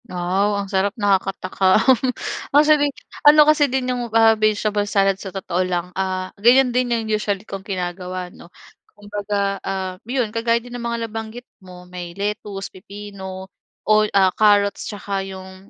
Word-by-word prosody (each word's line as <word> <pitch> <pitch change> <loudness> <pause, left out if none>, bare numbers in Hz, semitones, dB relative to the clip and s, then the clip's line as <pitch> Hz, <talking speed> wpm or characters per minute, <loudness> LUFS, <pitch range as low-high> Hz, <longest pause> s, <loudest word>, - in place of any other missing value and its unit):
Wow 190 +3 0
ang 200 - -2
sarap, 195 +2 0
nakakatakam. 195 +2 +2 0.6
Ang 290 +2 +5
sabi 300 -1 +4 0.3
ano 300 0 +7
kasi 295 -1 +4
din 260 0 -1
'yung 245 -1 -4
ah 225 0 +6
vegetable 210 -1 0
salad 195 -1 +1
sa 195 - -6
totoo 185 -1 -3
lang, 180 -1 -2
ah 185 0 -3
ganiyan 250 +2 +5
din 250 0 +1
'yung 230 -2 -1
usually 210 -1 -2
kong 195 -2 -7
ginagawa 180 -1 -5
'no. 170 - -15 0.5
Kumbaga 205 -1 -3
ah, 190 -1 -4
'yon 245 -4 -1
kagaya 230 0 +1
din 240 +1 -9
ng 245 - -6
mga 235 -1 -2
nabanggit 225 +2 -7 0.2
mo, 180 -1 -13
may 180 -1 -9
lettuce, 200 -1 -4
pipino, 190 -1 -9 0.4
o 215 - +3 0.2
ah 190 -2 +4
carrots, 205 -2 +2
'tsaka 200 -2 -4
'yung 190 0 -10
200 Hz, 155 wpm, -21 LUFS, 190-225 Hz, 0.6 s, ano